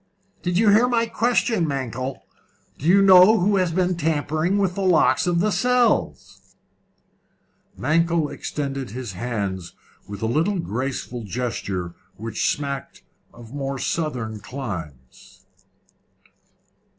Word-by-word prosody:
"Do 180 - -2
you 200 +5 +3
hear 220 +5 +5
my 235 -2 +2
question, 230 -5 +1
Mankell? 130 -4 -4 0.6
Do 150 - -3
you 195 +3 +6
know 190 +3 +8
who 200 +3 +2
has 180 -3 +1
been 180 +1 +1
tampering 160 +3 0
with 195 -3 +1
the 195 - -4
locks 185 -1 +3
of 170 -1 +2
the 210 +2 +1
cells?" 245 +4 0 1.2
Mankell 165 +2 +1
extended 135 -3 -4
his 120 -2 -6
hands 95 -4 -4 0.3
with 100 +1 -7
a - - +1
little 160 - +1
graceful 125 - -4
gesture 100 -6 -4 0.2
which 110 0 -2
smacked 140 -2 -4 0.3
of 115 +1 -13
more 135 -1 -3
southern 125 -8 -3
climes. 85 - -8
145 Hz, 120 wpm, -23 LUFS, 115-185 Hz, 1.2 s, know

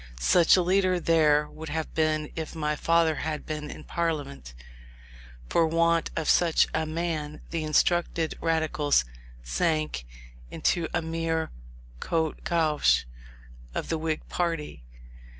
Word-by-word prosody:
Such 170 - +5
a 180 - +3
leader 185 0 +2
there 150 -3 +3
would 160 +1 -9
have 160 +1 -3
been, 155 -1 0
if 160 0 -5
my 150 -1 -1
father 165 0 +2
had 155 -1 -3
been 150 -1 -5
in - - -9
Parliament. 145 - -3 0.9
For 165 - +3
want 165 +1 +2
of 160 -2 -2
such 170 -2 +4
a 160 0 0
man, 155 -2 -3
the 165 -2 -2
instructed 165 +1 +1
Radicals 155 - +1 0.4
sank 65 - -1 0.4
into 170 - 0
a - - -1
mere 165 0 -2 0.5
Côté 160 - -1
Gauche 160 - +2 0.7
of - - -3
the 160 - -1
Whig 155 -1 -3
party. 165 - -3
160 Hz, 130 wpm, -27 LUFS, 150-165 Hz, 0.9 s, Such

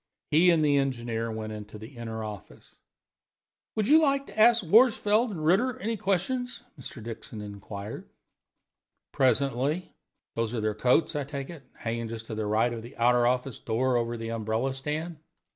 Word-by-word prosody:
He 170 +4 +6
and 160 -3 +4
the 145 -1 +4
engineer 120 -4 -1
went 110 0 -5
into 105 0 -8
the 110 +6 -11
inner 115 -2 -5
office. 105 -2 -10 1.0
"Would 215 -1 0
you 315 +2 +7
like 275 -2 +2
to - - -9
ask 235 0 +6
Worsfold 220 +3 +4
and 165 -7 -5
Ritter 240 +10 +3
any 230 -2 -2
questions?" 220 +6 -1 0.2
Mr. 115 - -9
Dixon 115 -1 -7
inquired. 100 0 -8 1.0
"Presently. 135 +5 +1 0.4
Those 115 +1 -2
are - - -1
their 110 0 0
coats, 125 +9 +2
I 145 - 0
take 140 +2 -6
it, 155 -6 -12
hanging 115 0 -3
just 110 0 -7
to 115 - -7
the 110 -1 -2
right 110 +3 +2
of 115 - -5
the 120 +4 -12
outer 120 0 +4
office 125 0 -1
door, 125 +3 0
over 120 0 0
the 115 0 -5
umbrella 115 +4 -1
stand?" 150 +5 -4
125 Hz, 170 wpm, -28 LUFS, 115-170 Hz, 1.0 s, you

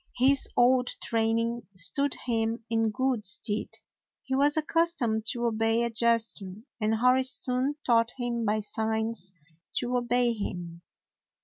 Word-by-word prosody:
His 270 +2 +4
old 250 +1 +4 0.2
train 225 0 +1
ing 235 +1 -2
stood 255 +11 +2
him 225 -1 -1
in 225 -1 +2
good 255 -1 -1
stead. 205 +2 +1 0.6
He 265 - -5
was 290 +3 +3
ac 310 - 0
customed 260 -11 0
to 240 +1 -1
obey 225 0 +1
a 235 - -1
gesture, 225 -4 0 0.2
and 215 0 +1
Hori 250 +3 +3
soon 260 +1 -1
taught 230 -1 +3
him 240 -2 -2
by 215 0 0
signs 220 -1 -3 0.4
to 245 +1 -1
obey 245 0 +1
him. 175 -5 -6
230 Hz, 140 wpm, -28 LUFS, 220-250 Hz, 0.6 s, His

